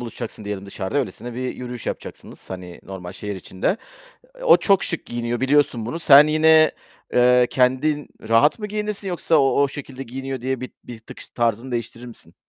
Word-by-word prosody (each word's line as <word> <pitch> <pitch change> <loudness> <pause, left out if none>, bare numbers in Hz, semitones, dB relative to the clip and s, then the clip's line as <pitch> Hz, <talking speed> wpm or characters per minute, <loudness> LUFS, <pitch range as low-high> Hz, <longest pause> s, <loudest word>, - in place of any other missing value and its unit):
buluşacaksın 115 -2 -7
diyelim 100 -1 -5
dışarıda, 100 +8 -3
öylesine 120 -2 -4
bir 130 +1 -3
yürüyüş 125 -1 -7
yapacaksınız, - - -7
hani, 90 -2 -8
normal 90 -2 -8
şehir 100 +1 -6
içinde. 95 - -2 0.7
O - - +7
çok 195 -2 +2
şık 165 - -4
giyiniyor, 120 0 -3
biliyorsun 130 -4 +2
bunu. 140 +8 -4
Sen 145 -2 +8
yine, 155 0 +5 0.4
eee, 125 0 +5
kendin 135 +4 +1 0.2
rahat 115 +7 +4
mı 210 - -4
giyinirsin, 210 -1 -4
yoksa 170 -2 +1
o, 140 0 +3
o 140 - +2
şekilde 135 -1 -8
giyiniyor 135 +1 -6
diye 130 0 -2
bir 130 - -6
bir 120 -2 -9
tık 110 - -13
ş - - -11
tarzını 120 +2 -1
değiştirir 120 +1 -5
misin? 120 - -14
125 Hz, 180 wpm, -22 LUFS, 115-145 Hz, 0.7 s, Sen